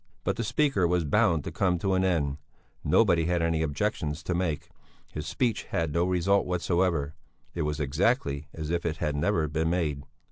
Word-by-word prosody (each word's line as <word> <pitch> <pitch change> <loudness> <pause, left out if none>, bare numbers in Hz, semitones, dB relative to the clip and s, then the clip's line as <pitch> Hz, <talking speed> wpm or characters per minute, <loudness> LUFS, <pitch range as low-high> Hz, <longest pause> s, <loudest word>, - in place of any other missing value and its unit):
But - - 0
the 115 - -2
speaker 115 - +2
was 90 0 +1
bound 85 -2 +2
to - - -5
come 90 +2 +1
to 95 +3 0
an 95 0 +2
end; 75 -7 +1 0.5
nobody 85 -1 +3
had 85 0 +1
any 80 -1 +1
objections 75 +1 -2
to 90 - -1
make; 85 -4 -2 0.4
his 75 +1 -5
speech 115 +8 -1
had 80 -3 -2
no 85 +2 +2
result 95 +2 +2
whatever; 85 -4 0 0.4
it 85 - -3
was 75 0 -1
exactly 75 - 0
as 80 0 -5
if 85 -1 0
it 80 -1 -2
had 75 -2 -1
never 80 +1 +1
been 80 +2 0
made. 80 -5 -1
85 Hz, 185 wpm, -28 LUFS, 75-90 Hz, 0.5 s, nobody